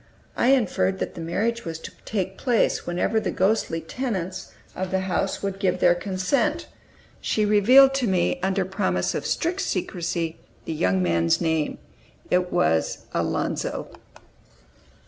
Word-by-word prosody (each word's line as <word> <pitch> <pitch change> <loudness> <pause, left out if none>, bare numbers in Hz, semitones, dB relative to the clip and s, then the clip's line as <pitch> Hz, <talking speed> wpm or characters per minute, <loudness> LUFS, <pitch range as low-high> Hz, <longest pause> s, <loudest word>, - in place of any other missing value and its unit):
I - - +2
inferred 190 - +2
that - - -4
the 170 - -7
marriage 220 +8 -1
was 165 -1 -5
to - - -8
take 190 -3 -2
place 245 0 +1
whenever 180 +5 +1
the - - -2
ghostly 190 -4 +1
tenants 185 - -4 0.2
of 185 0 -3
the 190 0 0
house 190 +1 -1
would 195 -1 -3
give 185 -2 +1
their 175 -1 +5
consent. 185 +7 -1 0.5
She 215 - 0
revealed 250 +7 +6
to 270 -3 0
me, 180 -2 +1
under 190 0 0
promise 190 +1 -1
of - - -3
strict 355 +3 -1
secrecy, 170 - -2 0.3
the 165 - -3
young 95 -9 +1
man's 85 -1 +2
name. 160 -2 0 0.5
It 180 0 +2
was 80 +1 +1
"Alonzo." - - -2
185 Hz, 145 wpm, -24 LUFS, 165-215 Hz, 0.5 s, revealed